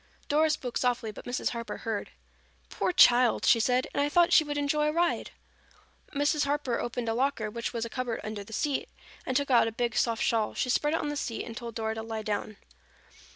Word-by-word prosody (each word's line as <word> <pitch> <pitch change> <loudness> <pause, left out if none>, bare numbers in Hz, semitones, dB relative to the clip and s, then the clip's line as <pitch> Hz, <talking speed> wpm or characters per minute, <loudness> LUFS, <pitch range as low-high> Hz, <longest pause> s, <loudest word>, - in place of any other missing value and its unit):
Dora 310 +1 +3
spoke 255 -5 -2
softly 245 -3 0
but - - -11
Mrs. 245 +1 -1
Harper 230 -3 -5
heard. 220 -3 -4 0.6
"Poor - - 0
child!" 245 -7 +5
she 240 -1 +5
said. 250 +3 +2
"And - - +1
I 290 - +1
thought 345 +3 +4
she 315 - +7
would 295 -1 -4
enjoy 300 +1 +1
a - - +2
ride." 340 +2 0 0.9
Mrs. 290 +1 +2
Harper 280 -4 -1
opened 240 0 -3
a 225 - +1
locker, 240 -3 -1
which 235 +2 -4
was 230 -1 -3
a - - -6
cupboard 245 -1 -3
under 215 -1 -5
the 205 - -15
seat, 280 +5 -1 0.4
and 260 - +1
took 280 -1 -1
out 235 -2 +5
a - - -2
big 235 0 -2
soft 230 -1 +1
shawl. 220 -2 0
She 250 - 0
spread 295 +5 +1
it - - 0
on 295 - -2
the 295 - -3
seat 235 -5 -3
and 230 - -8
told 235 -1 -7
Dora 220 -1 -2
to 225 - -5
lie 220 -1 -5
down. 210 0 -3
245 Hz, 225 wpm, -28 LUFS, 225-290 Hz, 0.9 s, she